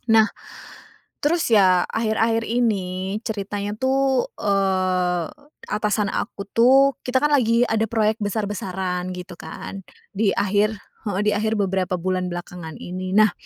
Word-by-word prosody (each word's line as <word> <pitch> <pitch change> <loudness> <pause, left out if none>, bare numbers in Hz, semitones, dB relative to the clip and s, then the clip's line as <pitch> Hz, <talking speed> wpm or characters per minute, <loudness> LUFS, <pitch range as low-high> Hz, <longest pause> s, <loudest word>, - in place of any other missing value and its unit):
Nah, 220 -1 +6 1.0
terus 325 0 +2
ya 185 -4 +5
akhir-akhir 225 0 +1
ini 195 -5 -1
ceritanya 205 -2 -3
tuh, 265 0 +1
eee, 185 -3 +1 0.4
atasan 210 -1 0
aku 200 - -3
tuh 265 +3 +5
kita 250 +1 +2
kan 295 - +3
lagi 235 -4 +3
ada 220 0 +1
proyek 220 -1 +1
besar-besaran 190 -3 -2
gitu 180 0 -8
kan, 160 +4 -7 0.4
di 205 -1 +2
akhir, 205 +2 +1 0.3
heeh, 195 -1 -1
di 210 - +3
akhir 220 +1 0
beberapa 190 -2 0
bulan 185 +1 -1
belakangan 175 -2 -7
ini. 185 +2 -4
Nah, 215 0 +6
205 Hz, 130 wpm, -22 LUFS, 185-225 Hz, 1.0 s, Nah